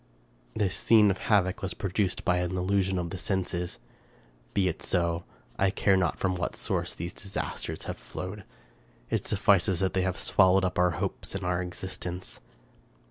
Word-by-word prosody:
This 95 -3 0
scene 105 -3 +5
of 95 - -3
havoc 95 -4 +3
was 95 -2 -3
produced 100 -2 -1
by 90 - +3
an 90 +1 -1
illusion 95 0 +1
of 85 -2 -2
the 95 - -5
senses. 95 -3 -2 0.8
Be 95 -2 +3
it 90 0 -2
so; 85 -1 0 0.3
I 95 - +4
care 100 0 +3
not 90 -3 +1
from 95 -1 0
what 90 -1 -2
source - - -1
these 85 +2 -5
disasters 100 0 -5
have - - -5
flowed; 95 +3 -6 0.7
it - - 0
suffices 95 -2 +3
that 95 0 +1
they 95 - +2
have 90 -1 -1
swallowed 95 0 +4
up 90 - -1
our 90 0 +5
hopes - - -3
and - - -3
our 90 0 +1
existence. 90 0 -5
95 Hz, 170 wpm, -28 LUFS, 90-95 Hz, 0.8 s, scene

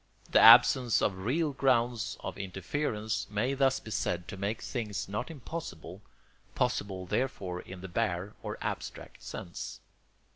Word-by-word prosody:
The - - +6
absence 120 +1 +8
of 95 -2 0
real 150 +4 +1
grounds 120 -4 +1
of - - -5
interference 105 - -2
may 110 +6 0
thus 135 -1 +2
be 110 - -10
said 90 -3 -1
to 105 - -5
make 100 +3 -2
things 110 -5 -3
not 105 +8 -3
impossible, 115 - -7 0.5
possible 95 -2 -1
therefore 95 -5 -2
in 95 -1 -10
the 95 - -6
bare 95 0 -1
or - - -5
abstract - - -5
sense. 85 -2 -7
110 Hz, 140 wpm, -30 LUFS, 95-125 Hz, 0.5 s, absence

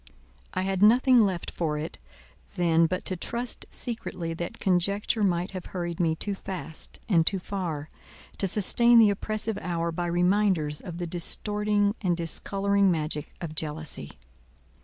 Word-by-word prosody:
I 185 - 0
had 190 0 -1
nothing 245 +3 +6
left 185 -4 -2
for 155 -3 -2
it 155 +2 -6 0.6
then 165 -2 +3
but 185 +2 -3
to 185 - -2
trust 235 +7 -3
secretly 185 -8 -3
that 170 +1 -6
conjecture 200 +4 +1
might 180 -2 0
have 185 -2 -7
hurried 175 -1 -4
me 165 -2 +2
too 205 +5 -3
fast 185 -4 -5
and 175 -7 +4
too 195 - +1
far, 175 -6 -5 0.5
to 195 - +1
sustain 235 +5 +6
the 220 -3 +7
oppressive 215 +1 -2
hour 170 -1 -2
by 175 +1 -3
reminders 175 -3 +1
of 175 -4 -8
the 175 - -3
distorting 205 +4 +1
and 180 -4 0
discolouring 195 +4 +1
magic 155 -3 -2
of 165 -3 -5
jealousy. 150 - -3
180 Hz, 150 wpm, -27 LUFS, 165-205 Hz, 0.6 s, the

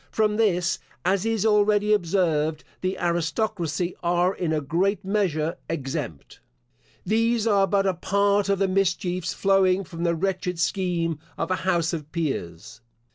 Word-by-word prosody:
From 215 -1 +1
this, 180 -6 +1 0.3
as 195 +3 +1
is 225 -2 0
already 210 0 +3
observed, 165 -5 +1 0.2
the 185 +1 -1
aristocracy 175 0 -1
are 175 +2 +2
in 175 -4 -2
a 155 - +1
great 180 +8 0
measure 180 -5 0
exempt. 135 - -5 0.7
These 230 +2 +1
are 200 -3 +3
but 195 +1 +1
a 190 - +2
part 200 +3 +1
of 200 - +2
the 195 0 +1
mischiefs 185 -1 0
flowing 195 -1 +3
from 170 -2 -7
the 170 -1 +2
wretched 180 0 -2
scheme 170 -3 -1 0.2
of 165 +2 -2
an 185 - +1
house 175 -3 0
of 155 -2 -5
peers. 115 - -4
185 Hz, 145 wpm, -25 LUFS, 165-200 Hz, 0.7 s, already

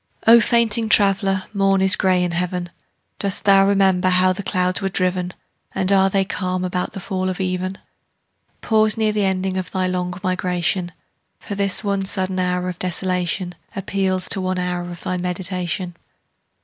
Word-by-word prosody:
O 230 +1 +8
fainting 230 -1 +2
traveller, 195 -2 +3
morn 195 -1 +2
is 190 0 +6
gray 185 -1 +2
in 175 - -1
heaven. 175 0 -3 0.5
Dost 200 -2 +1
thou 195 -1 +5
remember 190 -2 +2
how 185 0 +3
the 185 - -5
clouds 185 -1 0
were 195 - -1
driven? 180 -1 -1 0.4
And 190 0 +3
are 195 -1 +4
they 195 0 +1
calm 185 -2 -2
about 180 0 -3
the 195 - -6
fall 185 0 -3
of 185 - -5
even? 185 0 -3 0.8
Pause 215 -1 +3
near 220 -1 +1
the 210 -1 0
ending 190 0 -1
of 185 - -4
thy 185 -1 -1
long 180 -1 -2
migration; 180 -1 -1 0.5
For - - -7
this 200 +1 -1
one 200 -1 -1
sudden 190 -1 -1
hour 180 0 -1
of 180 -1 -6
desolation 180 0 -2 0.2
Appeals 190 -1 -1
to 195 - +1
one 185 0 -2
hour 180 -1 -3
of 175 0 -9
thy 185 - -2
meditation. 180 0 -2
185 Hz, 170 wpm, -20 LUFS, 180-195 Hz, 0.8 s, O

